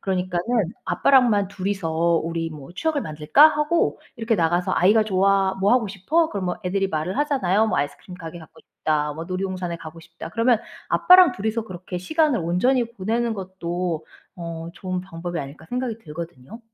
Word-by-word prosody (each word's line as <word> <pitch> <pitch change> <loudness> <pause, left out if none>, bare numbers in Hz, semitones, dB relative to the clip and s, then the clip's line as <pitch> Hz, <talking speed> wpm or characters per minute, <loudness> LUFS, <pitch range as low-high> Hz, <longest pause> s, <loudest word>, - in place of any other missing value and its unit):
그러니까는 180 -2 -1 0.4
"아빠랑만 235 -8 +3
2 195 0 -4
이서 190 -5 -2 0.3
우리 165 0 -3
뭐 150 +1 -10
추억을 315 - 0
만들까?"하고 295 - +3 0.2
이렇게 225 0 0
나가서 175 0 +1
아이가 210 +5 +4
"좋아." 195 -1 +2
"뭐 200 +4 +4
하고 240 -4 +2
싶어?" 290 - +1
그럼 195 -3 -3
뭐 180 - -2
애들이 195 +1 0
말을 160 +4 -2
하잖아요. 225 -8 +2
뭐 - - 0
"아이스크림 145 +5 -4
가게 165 0 -8
가고 160 - -14
싶다.", 150 -1 -2
뭐 165 +2 -6
"놀이동산에 185 -1 -3
가고 165 0 -10
싶다." 165 0 -10
그러면 230 +2 +3 0.3
아빠랑 365 -1 +7
2 195 +3 -5
이서 220 +1 -1
그렇게 185 -2 -7
시간을 300 - +1
온전히 235 +8 +1
보내는 230 +3 -1
것도 180 -4 -4 0.3
어 165 -1 -6
'좋은 185 -1 -4
방법이 175 -1 -6
아닐까?' 140 +3 -8
생각이 250 -2 -2
들거든요. 165 - -9
185 Hz, 395 characters per minute, -23 LUFS, 170-225 Hz, 0.4 s, 아빠랑